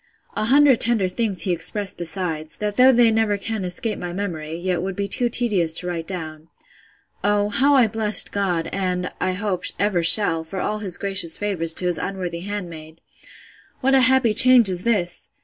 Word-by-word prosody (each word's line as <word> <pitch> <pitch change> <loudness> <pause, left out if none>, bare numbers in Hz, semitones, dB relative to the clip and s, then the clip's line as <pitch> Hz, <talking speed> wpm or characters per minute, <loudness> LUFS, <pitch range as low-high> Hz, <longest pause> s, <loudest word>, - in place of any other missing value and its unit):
A - - -1
hundred 275 +1 +4
tender 225 -5 +1
things 195 0 0
he 190 - 0
expressed 180 +4 0
besides, 165 -2 -3
that 210 -1 -3
though 255 +1 +6
they 235 -2 +4
never 220 -2 +1
can 220 0 -4
escape 185 +5 -1
my 175 -1 -6
memory, 165 -5 -5
yet 180 -1 -2
would 190 0 -4
be 200 0 -3
too 240 +4 0
tedious 200 -10 +1
to 180 - -4
write 170 -2 -4
down. 160 -4 -7 0.8
Oh, 205 0 +1
how 275 +7 +2
I 255 -3 +5
blessed 215 -1 0
God, 180 -5 -1
and, 180 -2 -2
I 185 - -1
hope, 185 -2 -3
ever 200 -3 0
shall, 165 -1 +3
for 175 +4 -7
all 215 +3 -3
his 190 -4 -2
gracious 195 -5 +1
favours 170 -6 -1
to 180 - +1
his 175 -1 -1
unworthy 180 -3 -5
handmaid! 170 -5 -8 0.8
What 270 +1 +1
a 265 - +5
happy 255 -3 +3
change 250 -2 +6
is 180 -1 -2
this! 190 -7 -1
195 Hz, 185 wpm, -21 LUFS, 175-215 Hz, 0.8 s, though